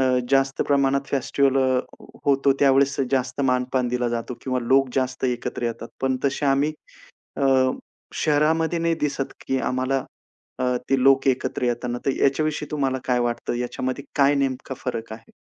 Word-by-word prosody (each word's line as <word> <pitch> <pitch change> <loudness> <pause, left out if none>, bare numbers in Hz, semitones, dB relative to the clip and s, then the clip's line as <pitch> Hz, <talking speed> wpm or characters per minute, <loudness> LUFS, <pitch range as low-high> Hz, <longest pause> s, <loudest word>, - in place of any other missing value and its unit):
अ, 130 -1 +3
जास्त 135 0 +2
प्रमाणात 140 -1 +3
फेस्टिव्हल 135 0 +1
अ, 130 -1 +2 0.5
होतो, 140 0 +4
त्यावेळेस 140 0 +4
जास्त 130 0 -1
मान-पान 125 -1 +1
दिला 125 0 0
जातो 120 +1 -3
किंवा 130 -1 -1
लोक 135 +2 +3
जास्त 130 0 -1
एकत्र 125 -1 -2
येतात. 115 0 -4
पण 130 -1 +1
तसे 140 +1 0
आम्ही 140 +3 +2 0.6
अ, - - -3 0.7
शहरामध्ये 160 +3 +1
नाही 165 0 +1
दिसत, 140 -2 -2
की 135 - 0
आम्हाला 130 +1 -1 0.5
अ, 125 0 +1 0.2
ते 135 -1 +3
लोकं 135 0 +5
एकत्र 130 0 -2
येतना 120 0 -1
तर - - +4
याच्याविषयी 150 +2 +1
तुम्हाला 135 -3 0
काय 125 -1 +1
वाटतं? 120 0 -2
याच्यामध्ये 130 +2 -3
काय 140 0 +4
नेमका 135 -1 -2
फरक 115 -3 -4
आहे? 110 - -12
135 Hz, 155 wpm, -23 LUFS, 125-140 Hz, 0.7 s, लोकं